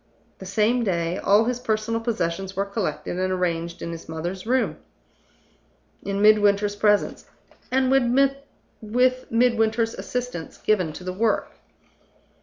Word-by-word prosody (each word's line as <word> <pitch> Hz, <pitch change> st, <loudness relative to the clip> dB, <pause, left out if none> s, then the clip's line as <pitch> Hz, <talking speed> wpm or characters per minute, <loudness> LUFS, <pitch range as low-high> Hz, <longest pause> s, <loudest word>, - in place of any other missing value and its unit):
The 190 Hz, -, -9 dB
same 220 Hz, +5 st, +2 dB
day, 170 Hz, -3 st, -1 dB
all 205 Hz, +3 st, +4 dB
his 245 Hz, +1 st, -1 dB
personal 225 Hz, -1 st, -1 dB
possessions 195 Hz, -4 st, -2 dB
were 195 Hz, +1 st, 0 dB
collected 195 Hz, -3 st, -3 dB
and 185 Hz, 0 st, 0 dB
arranged 170 Hz, -2 st, -2 dB
in 170 Hz, -, -4 dB
his 165 Hz, -1 st, -9 dB
mother's 175 Hz, +5 st, -5 dB
room 255 Hz, +2 st, +1 dB, 1.2 s
in 200 Hz, +1 st, -2 dB
Midwinter's 205 Hz, -1 st, +4 dB
presence, 205 Hz, 0 st, +1 dB, 0.4 s
and 260 Hz, 0 st, +2 dB
with 255 Hz, -2 st, 0 dB
Midwinter's 230 Hz, -1 st, +2 dB
assistance 250 Hz, -10 st, -5 dB
given 185 Hz, -7 st, +1 dB
to 180 Hz, -, -9 dB
the 185 Hz, 0 st, -4 dB
work. 220 Hz, +3 st, 0 dB
210 Hz, 125 wpm, -24 LUFS, 185-235 Hz, 1.2 s, all